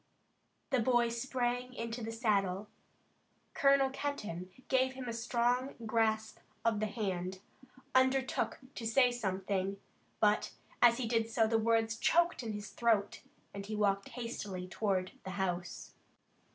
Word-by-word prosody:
The 260 - +3
boy 240 0 +3
sprang 245 +1 -2
into 230 0 -4
the 225 - -3
saddle, 205 -4 0 0.9
Colonel 275 -1 +4
Kenton 210 -12 -4 0.2
gave 260 0 +2
him 260 -1 -7
a 235 - -2
strong 245 +3 0
grasp 220 0 +1 0.3
of 225 -2 +2
the 215 - 0
hand, 190 -4 -3 0.6
undertook 260 0 +2 0.2
to 225 - -4
say 245 +2 +4
something 195 -3 -2 0.4
but, 210 0 +2 0.3
as 235 -1 +7
he 255 - -1
did 225 -1 +1
so, 225 0 +3
the 225 0 +2
words 225 0 +2
choked 340 +6 +3
in 225 -3 -4
his 205 0 -6
throat, 220 -4 +1 0.3
and 200 0 -6
he 215 - -3
walked 200 -1 +1
hastily 210 -6 -5
toward 185 -1 -1
the - - -6
house. 180 -2 -3
225 Hz, 140 wpm, -33 LUFS, 200-245 Hz, 0.9 s, as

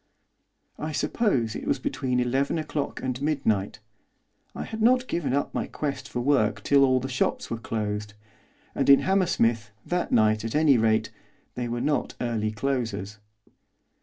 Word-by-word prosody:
I 155 +1 -4
suppose 145 - 0
it - - -6
was - - +2
between 125 -3 -1
eleven 135 +5 0
o'clock 150 -2 -3
and 130 0 -3
midnight. 135 -10 0 0.8
I - - -4
had 220 0 -6
not 250 +2 +4
given 155 -6 -1
up 140 +2 -1
my - - -2
quest 140 -3 -4
for 125 - -3
work 110 -6 +1
till 140 -1 +5
all 130 -1 +4
the 130 - -4
shops 130 -1 -1
were 115 - -2
closed, 105 -2 -3 0.6
and - - 0
in 140 - +8
Hammersmith, 120 - +1 0.2
that 175 0 -1
night, 110 -1 +3
at 115 +3 -4
any 150 -5 +5
rate, 110 -1 +2 0.4
they 125 -1 -3
were 120 0 -3
not 150 0 -1
early 115 -3 -1
closers. 110 -4 -3
125 Hz, 160 wpm, -26 LUFS, 110-145 Hz, 0.8 s, in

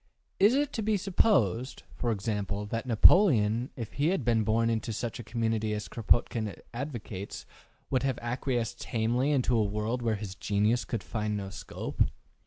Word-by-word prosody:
Is 210 +6 +6
it 290 0 0
to 225 - -2
be 215 0 +1
supposed, 140 - +1
for 120 - -2
example, 105 -1 -2
that 115 +4 -4
Napoleon, 120 - +5
if 115 -5 -6
he 145 +3 +1
had 170 -8 0
been 115 -2 +3
born 115 +2 +2
into 115 0 -1
such 115 +2 -4
a - - -6
community 110 -1 -1
as 105 - -5
Kropotkin 115 -2 +1 0.2
advocates, 115 -7 -6 0.5
would 130 -2 +2
have 135 -3 0
acquiesced 120 -1 -2
tamely 120 +3 0
in 140 -4 +2
a 120 -3 +3
world 105 +4 -1
where 115 -2 +1
his 100 -2 -6
genius 105 +5 +1
could 115 -5 -3
find 105 +1 -2
no 100 -1 -5
scope? - - -6
115 Hz, 170 wpm, -29 LUFS, 105-125 Hz, 0.5 s, Is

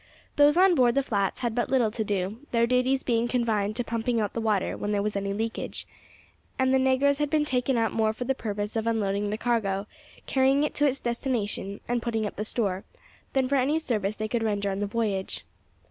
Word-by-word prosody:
Those 290 +2 +5
on 375 0 +6
board 245 -6 +3
the 275 - +3
flats 200 -6 -1
had 240 -3 -1
but 240 +1 -1
little 245 -5 +2
to 220 0 -2
do, 200 +1 -2
their 235 -1 +3
duties 255 +2 +1
being 235 -1 +1
confined 220 -4 0
to 245 - 0
pumping 230 +1 -1
out 210 -2 -1
the 230 - -2
water 215 -4 0
when 205 - -3
there 205 -1 +1
was 210 0 -2
any 200 0 -1
leakage; 225 +3 -3 0.7
and 260 0 +2
the 265 - +4
negroes 265 +2 +3
had 295 -1 0
been 300 0 +2
taken 255 -2 0
up 225 -1 +1
more 220 -1 +1
for 220 +3 -5
the 265 +2 +1
purpose 210 -3 -4
of 225 0 -1
unloading 205 -2 0
the 210 - -2
cargo, 210 -5 0 0.4
carrying 270 +2 +3
it 300 - -1
to 290 - +2
its 275 -1 0
destination, 235 -5 -2
and 240 0 0
putting 225 -2 -1
up 205 - -5
the 210 - -3
store, 200 -5 0 0.5
than 265 -1 +2
for 280 +1 +2
any 275 +4 +2
service 215 -9 -1
they 215 0 -3
could 235 +1 -1
render 205 -2 0
on 195 - -3
the 205 - -1
voyage. 200 - -2
230 Hz, 225 wpm, -27 LUFS, 210-260 Hz, 0.7 s, on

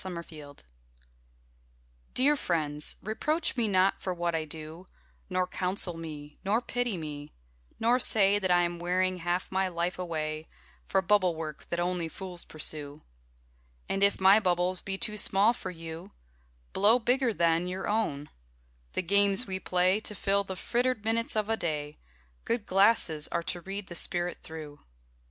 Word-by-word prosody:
Dear 175 -3 -5
Friends 150 -4 -11 1.5
Dear 285 +4 +4
friends, 150 - 0
reproach 305 - -1
me 235 -3 +1
not 190 -1 +2
for 185 -1 -3
what 175 0 -1
I 160 -1 -1
do, 160 +3 -8 0.4
Nor 185 -1 +1
counsel 180 -1 +1
me, 150 -3 -8
nor 205 +4 +2
pity 245 -4 -2
me; 150 -2 -7 0.5
nor 240 +3 +3
say 205 -4 +4
That 190 -2 -1
I 175 0 +4
am 175 0 -2
wearing 185 +1 0
half 175 +1 -2
my 190 0 +1
life 175 +1 -2
away 155 -3 -3 0.4
For 190 -1 +2
bubble 185 -2 +3
work 155 -2 -7
that 170 - -2
only 175 -1 -1
fools 180 +1 -5
pursue. 150 -1 -4 0.8
And 195 - -1
if 200 0 +4
my 195 +2 +7
bubbles 180 -2 0
be 195 -1 -4
too 210 +2 -1
small 205 +3 +4
for 190 - -6
you, 165 - -9 0.6
Blow 210 +5 +5
bigger 250 +1 +2
then 170 -2 +2
your 185 +1 -4
own: 150 -10 -1 0.6
the - - -1
games 200 +4 +3
we 190 -1 -4
play 185 +2 +2
To 215 -1 -3
fill 200 +1 +1
the 190 -1 -6
frittered 240 +2 -1
minutes 230 +1 +1
of 215 -1 0
a 225 - +1
day, 150 -6 -3 0.4
Good 230 -3 -1
glasses 190 -6 +3
are 170 - -2
to 175 +1 -2
read 195 +3 -5
the 175 - -9
spirit 175 +1 0
through. 155 -2 -9
185 Hz, 160 wpm, -29 LUFS, 165-205 Hz, 1.5 s, my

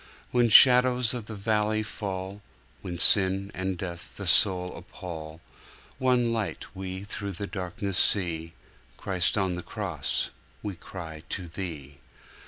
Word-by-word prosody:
When 120 -1 +2
shadows 125 +1 +7
of 120 -4 -6
the 110 - -7
valley 110 +1 -1
fall, 95 -1 -6 0.4
When 90 -2 -6
sin 95 +2 +6
and 95 -1 -3
death 85 -2 -8
the - - -6
soul 90 -1 +4
appall, 80 -2 -9 0.6
One 125 -2 +1
light 110 -2 -5
we 95 0 -6
through 100 -1 -6
the 100 +3 -6
darkness 95 -1 -3
see— 85 -4 0 0.4
Christ 95 +1 0
on 95 -2 0
the 90 - -5
Cross, 90 -9 -3 0.3
We 105 - -4
cry 80 -3 -9
to 90 -3 -4
Thee! 80 -6 -7
95 Hz, 135 wpm, -26 LUFS, 90-105 Hz, 0.6 s, shadows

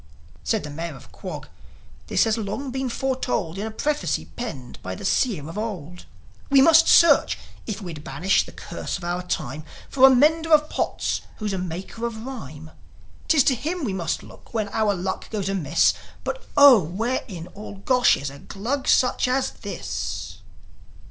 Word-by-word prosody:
Said 220 -3 0
the 150 - -6
Mayor 165 +1 -5
of 135 - -15
Quog: - - -7 0.6
"This - - +3
has 220 -1 +2
long 230 +5 -4
been 265 0 -2
foretold 250 -9 -2
In 215 - -2
a - - -4
prophecy 295 +7 -1
penned 135 - -7
by 95 0 -5
the - - -8
Seer 190 - +1
of 165 +6 -5
old. 180 -6 -6 0.4
We 275 -1 +6
must 325 +4 +7
search, 335 -4 +6 0.3
if 215 -2 -4
we'd 160 -5 -7
banish 155 +9 +1
the - - -12
curse 170 - -5
of 175 - -12
our 175 +1 -2
time, 155 -4 -4 0.3
For 265 -1 +7
a - - +7
mender 315 +5 +3
of 300 0 +4
pots - - -1 0.2
who's 210 -2 -3
a 190 - -2
maker 185 +6 -4
of 225 0 -7
rhyme. 160 - -8 0.6
'Tis 300 -5 +5
to 265 - +4
him 320 +8 -3
we 210 -7 -1
must 170 -4 -2
look - - -15
when 215 -2 0
our 210 -1 +1
luck 185 +1 -4
goes 200 -3 -2
amiss. 165 -5 +2 0.3
But, - - -5
Oh, 280 -7 +9
where 215 +10 -2
in 170 -5 -7
all 205 +1 -9
Gosh 250 +5 +3
is 140 0 -5
a 140 - -11
Glug 250 +8 -4
such 250 0 +3
as 260 +1 +1
this?" - - -5
215 Hz, 180 wpm, -24 LUFS, 175-260 Hz, 0.6 s, Oh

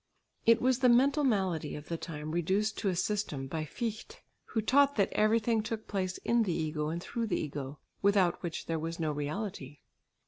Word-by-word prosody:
It 230 +1 +5
was 255 -1 +3
the 250 -1 +5
mental 275 +5 +4
malady 190 - 0
of 150 0 -9
the 170 - -2
time 155 -2 -6
reduced 190 +6 0
to 200 - +1
a 185 - 0
system 175 -8 -1
by 155 +3 -3
Fichte, 220 +7 -5 0.3
who 225 - -2
taught 280 +6 +4
that 200 - +2
everything 220 +1 +3
took 220 0 -5
place 185 -2 -2
in 235 0 +3
the 205 -5 +1
ego 155 -2 -2
and 165 +2 -2
through 230 -1 -3
the - - 0
ego, 145 -1 -5 0.2
without 195 -3 +3
which 170 -3 -4
there 165 -1 -1
was 165 +2 -4
no 155 -2 0
reality. 150 -1 -4
190 Hz, 195 wpm, -31 LUFS, 155-225 Hz, 0.3 s, It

